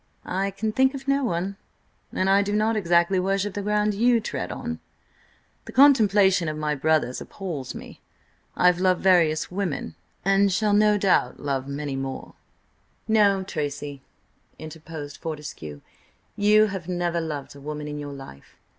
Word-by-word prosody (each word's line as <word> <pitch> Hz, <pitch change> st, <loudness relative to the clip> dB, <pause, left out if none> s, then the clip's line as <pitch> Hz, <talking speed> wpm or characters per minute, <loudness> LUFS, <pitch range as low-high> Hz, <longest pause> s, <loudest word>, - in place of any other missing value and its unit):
"I 195 Hz, +2 st, -1 dB
can 215 Hz, +3 st, -3 dB
think 265 Hz, +4 st, +2 dB
of 270 Hz, 0 st, -8 dB
no 275 Hz, 0 st, +2 dB
one. 195 Hz, -2 st, -2 dB, 0.5 s
And 185 Hz, -, -1 dB
I 195 Hz, +1 st, +5 dB
do 205 Hz, 0 st, -2 dB
not 215 Hz, +2 st, +1 dB
exactly 175 Hz, -1 st, +2 dB
worship 195 Hz, +2 st, -1 dB
the 205 Hz, -, -3 dB
ground 210 Hz, +1 st, +1 dB
you 235 Hz, +3 st, +3 dB
tread 225 Hz, -, -4 dB
on. 240 Hz, -1 st, -5 dB, 0.9 s
The -, -, -9 dB
contemplation 205 Hz, -, +5 dB
of 155 Hz, 0 st, -3 dB
my 150 Hz, -1 st, -1 dB
brothers 150 Hz, -3 st, 0 dB
appals 165 Hz, -10 st, -6 dB
me. -, -, -11 dB, 0.5 s
I -, -, +1 dB
have 180 Hz, -1 st, +5 dB
loved 185 Hz, -1 st, +2 dB
various 170 Hz, -5 st, +3 dB
women, 180 Hz, -5 st, -3 dB, 0.3 s
and 195 Hz, 0 st, +3 dB
shall 205 Hz, +2 st, +1 dB
no 210 Hz, 0 st, +4 dB
doubt 190 Hz, -10 st, +1 dB
love 135 Hz, -2 st, -2 dB
many 140 Hz, 0 st, -4 dB
more—" 135 Hz, 0 st, -5 dB, 0.7 s
"No, 205 Hz, -3 st, +3 dB
Tracy," 145 Hz, -5 st, -5 dB, 0.6 s
interposed 155 Hz, -2 st, -9 dB
Fortescue, 145 Hz, -, -7 dB, 0.5 s
"you 210 Hz, +1 st, +5 dB
have 190 Hz, -5 st, -5 dB
never 175 Hz, -1 st, -1 dB
loved 150 Hz, -4 st, -6 dB
a 140 Hz, -, -13 dB
woman 150 Hz, +1 st, -5 dB
in 150 Hz, 0 st, -5 dB
your 145 Hz, -1 st, -6 dB
life. 135 Hz, -, -12 dB
185 Hz, 155 wpm, -24 LUFS, 150-205 Hz, 0.9 s, I